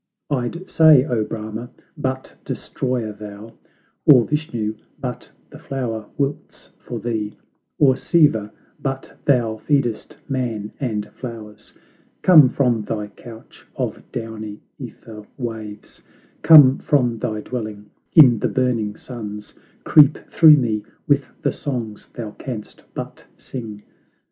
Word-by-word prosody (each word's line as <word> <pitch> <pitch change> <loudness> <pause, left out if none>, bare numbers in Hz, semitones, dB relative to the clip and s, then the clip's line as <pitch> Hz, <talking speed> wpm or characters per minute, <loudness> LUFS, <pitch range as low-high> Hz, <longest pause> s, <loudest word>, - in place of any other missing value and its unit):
I'd 145 +8 -2
say, 155 -5 +7
O 120 -7 0
Brahma, 110 +2 -6 0.3
but 130 0 -4
destroyer 125 -4 -3
thou; 105 +1 -10 0.5
Or 125 -6 +8
Vishnu, 120 -8 -2 0.3
but - - -6 0.2
the - - -11
flower 115 -5 -4
wilts 140 0 -4
for - - -7
thee; 110 -3 -3 0.4
Or 135 -3 +5
Siva, 135 -10 +2 0.3
but 135 -1 -4
thou 120 -5 +2
feedest 120 -4 -1
man 115 -6 -3
and 110 -7 -2
flowers; 110 -4 -10 0.5
Come 155 -8 +8
from 120 -5 +1
thy 105 0 -4
couch 115 +1 -14
of - - -3
downy 110 -2 -6 0.2
^ther 105 -2 -10
waves, 110 -4 -7 0.4
Come 145 -5 +8
from 125 -6 +1
thy 110 -2 -3
dwelling 105 -4 -6 0.2
in 130 -9 +8
the - - +1
burning 120 -5 0
suns, 105 -5 -8 0.3
Creep 150 -2 +6
through 155 -2 +8
me 110 -5 0 0.2
with - - +3 0.2
the - - +2
songs 120 -7 -5
thou 110 -3 -5
canst 110 -2 -8
but - - -7
sing. 110 -5 -8
115 Hz, 120 wpm, -21 LUFS, 105-135 Hz, 0.5 s, Or